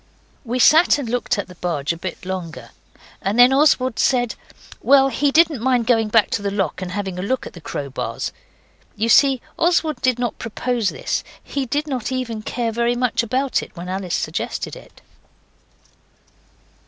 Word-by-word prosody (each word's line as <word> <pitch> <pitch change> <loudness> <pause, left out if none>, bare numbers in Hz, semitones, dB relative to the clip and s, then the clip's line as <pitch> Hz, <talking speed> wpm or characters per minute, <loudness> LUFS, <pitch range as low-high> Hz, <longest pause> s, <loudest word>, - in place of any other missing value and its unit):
We 245 0 -3
sat 310 +7 +6
and 280 -4 -4
looked 245 -1 -1
at 205 - -3
the 180 - -12
barge 170 -4 -2
a - - -7
bit 180 +1 -7
longer, 165 -10 -6 0.5
and 200 +4 -1
then 245 +2 +7
Oswald 265 -4 +3
said, 245 -3 +2 0.5
well, 270 -1 +5
he 280 +3 +1
didn't 315 -5 +3
mind 250 -2 +2
going 225 -2 +2
back 215 0 +3
to - - -1
the 200 - -1
lock 195 -3 -2
and 185 - -4
having 190 -2 -4
a - - -2
look 250 +7 -2
at - - -9
the 175 - -12
crowbars. 140 -3 -4 0.6
You 225 +2 -1
see 265 +1 +5 0.2
Oswald 330 -2 +1
did 255 -2 +2
not 240 -2 -3
propose 230 -1 -1
this; - - -3 0.2
he 275 -2 -3
did 290 +5 -1
not 260 -5 -3
even 245 -4 -3
care 235 +1 -2
very 235 +1 0
much 250 -1 +1
about 255 +4 0
it - - -11
when 175 +1 -7
Alice 185 -2 -2
suggested - - -3
it. - - -15
235 Hz, 180 wpm, -21 LUFS, 195-260 Hz, 0.6 s, then